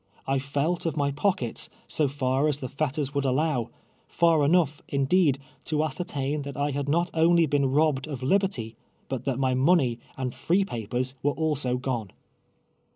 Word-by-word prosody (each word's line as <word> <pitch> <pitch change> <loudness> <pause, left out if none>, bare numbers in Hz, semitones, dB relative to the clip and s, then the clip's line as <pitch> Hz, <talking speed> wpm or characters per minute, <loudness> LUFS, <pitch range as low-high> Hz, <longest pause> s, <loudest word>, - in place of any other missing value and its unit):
1 135 0 +1
felt 145 +6 -1
of 160 - -2
my 140 -1 +1
]^o(dvets, 145 - -1 0.2
so 150 - +1
far 135 +1 0
iis 145 -2 0
the 130 - -4
fetters 140 0 -2
would 140 -1 0
aUow 135 -2 0 0.2
— - - -37
far 165 -3 +3
enough, 155 -1 +2
indee<l, 140 +1 +3 0.3
to 155 -1 0
ascertain 150 -3 -2
that 140 -2 -7
I 145 +1 0
liad 140 0 -3
not 170 +4 +1
only 165 +1 +4
been 140 -2 +1
robbed 145 -1 +2
of 135 -4 -6
liberty, 135 - 0 0.4
Ijut 130 - -3
that 135 -3 0
my 130 -1 +1
nutney 130 -3 +3 0.2
and 130 -2 -3
free 190 +4 +1
pai)ers 120 - -3
were 145 0 +1
also 145 -6 0
gone 125 -5 -3
140 Hz, 170 wpm, -26 LUFS, 130-155 Hz, 0.4 s, only